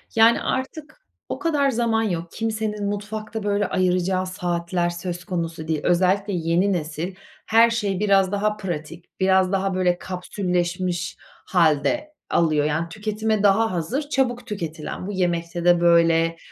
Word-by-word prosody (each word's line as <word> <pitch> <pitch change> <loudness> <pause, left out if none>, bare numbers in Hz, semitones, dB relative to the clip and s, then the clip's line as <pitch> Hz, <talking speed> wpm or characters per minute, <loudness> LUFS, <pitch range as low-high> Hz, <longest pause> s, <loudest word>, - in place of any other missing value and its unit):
Yani, 225 +1 +5
artık 305 - -4 0.3
o - - -4
kadar 295 -5 +2
zaman 230 -2 +1
yok. 170 -5 -3
Kimsenin 215 -2 -2
mutfakta 210 +2 -4
böyle 205 0 +1
ayıracağı 185 0 +1
saatler 175 -1 -1
söz 175 0 -5
konusu 165 -3 -4
değil. 160 -1 0
Özellikle 190 +3 +2
yeni 175 +3 +1
nesil, 165 +2 -4 0.3
her 230 +1 +5
şeyi 205 -5 -1
biraz 195 -2 +3
daha 210 +1 0
pratik, 170 -3 -6
biraz 190 -1 +3
daha 195 0 0
böyle 180 -1 +2
kapsülleşmiş 180 -1 -2 0.3
hâlde 190 - +1
alıyor, 155 -3 +2
yani 160 +3 -1
tüketime 215 +2 -1
daha 220 +3 +4
hazır 185 - -2
çabuk 245 -4 0
tüketilen. 165 -4 -5
Bu - - -3
yemekte 175 -2 -1
de 175 -1 +5
böyle, 165 -1 +4
185 Hz, 140 wpm, -23 LUFS, 170-215 Hz, 0.3 s, Yani